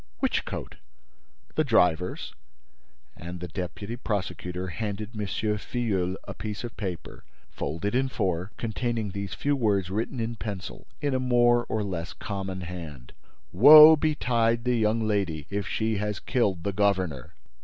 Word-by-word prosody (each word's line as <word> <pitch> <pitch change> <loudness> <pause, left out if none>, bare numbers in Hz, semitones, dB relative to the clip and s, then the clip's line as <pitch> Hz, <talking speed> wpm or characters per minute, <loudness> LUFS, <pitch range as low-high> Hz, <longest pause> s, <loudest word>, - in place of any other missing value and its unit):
"Which - - 0
coat?" - - -6 0.8
"The 155 - +2
driver's." 90 - +1 0.8
And 85 +1 -7
the 90 - -5
deputy 90 +6 -5
prosecutor 90 -4 -3
handed 105 +2 -4
M. 105 -1 -3
Filleul 105 -3 -1
a - - -5
piece 105 0 -6
of 120 -1 -6
paper, 95 -6 -6 0.3
folded 85 +9 -3
in 130 +1 +1
four, 95 -4 -2
containing 115 -2 -2
these 100 0 -5
few 145 0 0
words 100 -7 +1
written 115 +5 -2
in 115 0 -3
pencil, 100 -5 -6
in 145 -2 0
a 130 - +1
more 120 -1 +3
or 110 -1 -2
less 90 -5 -4
common 95 -2 -5
hand: 80 -8 -8 0.4
"Woe 150 - +10
betide 120 -7 +1
the 125 0 +1
young 110 0 +1
lady, 90 -8 -1
if 100 -2 -2
she 110 -1 -1
has 105 0 -2
killed 100 -10 0
the 100 - -2
governor!" 95 -11 0
105 Hz, 145 wpm, -27 LUFS, 90-115 Hz, 0.8 s, Woe